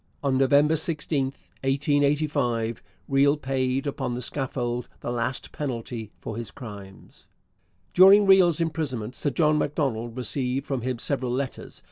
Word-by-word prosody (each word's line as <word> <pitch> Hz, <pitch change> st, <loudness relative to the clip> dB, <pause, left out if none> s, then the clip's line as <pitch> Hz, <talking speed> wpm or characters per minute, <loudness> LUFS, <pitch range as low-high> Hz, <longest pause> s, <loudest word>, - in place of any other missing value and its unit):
On 135 Hz, -2 st, +1 dB
November 145 Hz, +4 st, +4 dB
16, 150 Hz, -3 st, 0 dB
1885, 140 Hz, -3 st, 0 dB, 0.3 s
Riel 140 Hz, +2 st, +3 dB
paid 130 Hz, -1 st, -1 dB
upon 135 Hz, -3 st, -2 dB
the 125 Hz, -, -4 dB
scaffold 120 Hz, -2 st, -3 dB
the -, -, -3 dB
last 120 Hz, +2 st, -3 dB
penalty 115 Hz, -5 st, -5 dB
for 110 Hz, -, -6 dB
his 115 Hz, -3 st, -5 dB
crimes. 100 Hz, -6 st, -11 dB, 0.7 s
During 195 Hz, +3 st, +8 dB
Riel's 185 Hz, -4 st, +5 dB
imprisonment 140 Hz, -8 st, -2 dB
Sir 145 Hz, -, -1 dB
John 150 Hz, +2 st, +2 dB
Macdonald 125 Hz, -6 st, -2 dB
received 130 Hz, +2 st, -2 dB
from 135 Hz, -4 st, -2 dB
him 125 Hz, +1 st, -2 dB
several 130 Hz, 0 st, -2 dB
letters. 130 Hz, +1 st, -4 dB
135 Hz, 130 wpm, -25 LUFS, 120-150 Hz, 0.7 s, During